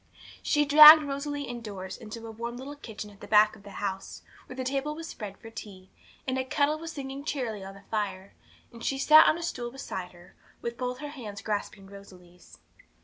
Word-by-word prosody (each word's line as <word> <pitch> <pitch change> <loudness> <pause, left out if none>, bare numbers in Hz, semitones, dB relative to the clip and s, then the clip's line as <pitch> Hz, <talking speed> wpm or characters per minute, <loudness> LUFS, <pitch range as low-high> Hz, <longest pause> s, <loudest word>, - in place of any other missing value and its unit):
She 295 0 +2
dragged 305 +2 +11
Rosalie 285 0 -4
indoors 210 -7 -7
into 225 +1 -9
a 225 - -7
warm 235 +2 -6
little 275 +3 -8
kitchen 220 -6 -9
at 200 - -18
the - - -9
back 210 0 +5
of - - -16
the 200 - -12
house, 195 -1 -5 0.2
where 255 - -9
the 260 - -4
table 275 +3 -2
was 330 +1 -7
spread 205 -8 -8
for 225 - -12
tea, 195 -4 -11 0.4
and 260 0 0
a - - 0
kettle 290 +4 0
was 330 0 -7
singing 275 -2 -7
cheerily 240 -9 -3
on 195 0 -9
the 200 - -15
fire; 200 -3 -3 0.4
and 230 0 -12
she 270 - -1
sat 310 +3 +7
on 310 - +3
a 340 - -6
stool 245 -7 -4
beside 190 -8 -7
her, 175 0 -17 0.3
with 235 0 -5
both 250 0 -3
her 295 - -8
little 285 -4 -10
hands 200 -1 -8
grasping 205 -2 -4
Rosalie's. 185 -3 -15
235 Hz, 210 wpm, -28 LUFS, 200-280 Hz, 0.4 s, dragged